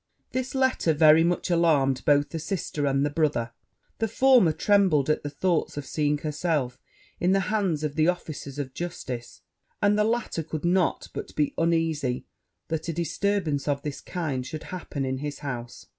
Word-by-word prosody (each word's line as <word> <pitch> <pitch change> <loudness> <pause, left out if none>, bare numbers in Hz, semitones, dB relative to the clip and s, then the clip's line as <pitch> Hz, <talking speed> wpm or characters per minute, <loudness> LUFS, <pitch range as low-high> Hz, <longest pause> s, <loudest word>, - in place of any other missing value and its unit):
This 260 +1 -3
letter 260 -11 +2
very 155 +1 +7
much 175 +1 0
alarmed 145 -6 +3
both 145 0 +4
the 165 - -4
sister 155 -4 -2
and 140 +1 +2
the 145 - -1
brother: 145 -7 0 0.5
the 225 - +1
former 250 -5 +5
trembled 170 -6 +3
at - - 0
the 145 - -4
thoughts 165 +1 0
of 145 - -4
seeing 150 0 0
herself 150 -3 -2 0.4
in 180 +2 +3
the 195 - +4
hands 190 -8 0
of 150 -2 -1
the 155 0 +3
officers 155 -6 -3
of 135 -3 -4
justice; 130 -9 -6 0.4
and 205 +1 +3
the - - +5
latter 225 -6 -1
could 155 0 -5
not 180 0 +1
but - - -7
be 150 -1 +1
uneasy 165 -6 0 0.4
that 160 0 -3
a - - -1
disturbance 170 -2 -1
of 140 -1 0
this 145 -2 -5
kind 155 -8 -3
should 155 +3 -6
happen 145 -6 -4
in 130 0 -2
his 145 0 -4
house. 120 -3 -6
155 Hz, 175 wpm, -26 LUFS, 145-175 Hz, 0.5 s, very